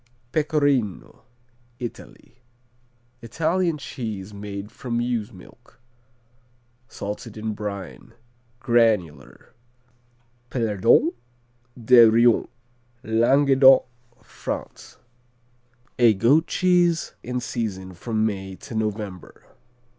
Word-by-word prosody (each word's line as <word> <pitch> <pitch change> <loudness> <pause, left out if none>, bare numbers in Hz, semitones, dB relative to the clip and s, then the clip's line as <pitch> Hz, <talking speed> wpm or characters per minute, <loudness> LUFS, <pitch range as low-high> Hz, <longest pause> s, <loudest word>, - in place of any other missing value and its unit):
Pecorino 145 - -1 0.5
Italy 120 +1 -10 0.8
Italian 165 +7 -1
cheese 110 -8 -7
made 100 0 -7
from 120 -2 -4
ewe's 120 -2 -2
milk. 110 +4 -17 1.1
Salted 105 +2 -7
in 110 0 -3
brine. 105 +2 -7 0.5
Granular. 110 - 0 1.0
Pelardon 115 - +2 0.7
de 120 0 +7
Rioms 115 +1 +3 0.6
Languedoc, 135 +4 +5 0.4
France - - -7 1.0
A 115 -3 +5
goat 135 - +3
cheese 175 -2 +1
in 125 +1 -4
season 100 -7 -5
from 110 +4 -2
May 95 -3 -4
to 115 - -11
November. 105 -4 -5
115 Hz, 80 wpm, -23 LUFS, 105-130 Hz, 1.1 s, de